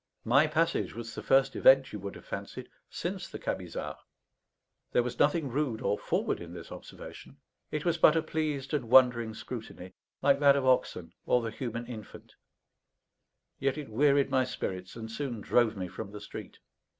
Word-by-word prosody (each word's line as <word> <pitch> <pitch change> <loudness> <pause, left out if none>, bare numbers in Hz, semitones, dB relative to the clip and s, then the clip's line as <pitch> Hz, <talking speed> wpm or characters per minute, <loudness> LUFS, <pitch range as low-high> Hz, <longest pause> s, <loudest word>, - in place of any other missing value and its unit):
My 140 +7 +5
passage 165 +2 0
was 115 -1 -7
the - - -6
first 135 0 +3
event, 135 0 +5
you 105 - -4
would 100 +1 -6
have - - -12
fancied, - - -7 0.2
since - - -4
the - - -8
Camisards. - - -4 0.9
There 120 - +4
was 125 - -5
nothing 145 0 +2
rude 130 -4 -1
or 100 -1 0
forward - - -1
in - - -9
this - - -10
observation; - - -11 0.3
it 150 +1 -3
was 170 - +1
but 155 - +6
a 160 - +2
pleased 150 -3 -2
and 130 -6 -1
wondering 120 -3 +5
scrutiny, 110 -6 -8 0.3
like 140 0 +4
that 140 -1 +6
of 140 -2 0
oxen 130 -1 +1
or 125 - +3
the 115 - -3
human 120 -1 -5
infant; 110 -4 -10 1.3
yet 135 +1 0
it 150 -5 -6
wearied 140 +4 +3
my 130 - +3
spirits, 95 -7 -5
and 110 -1 -7
soon 125 -2 -4
drove 110 0 +2
me 90 -1 -3
from 90 - -7
the 105 - -7
street. 100 - -9
130 Hz, 175 wpm, -30 LUFS, 110-140 Hz, 1.3 s, but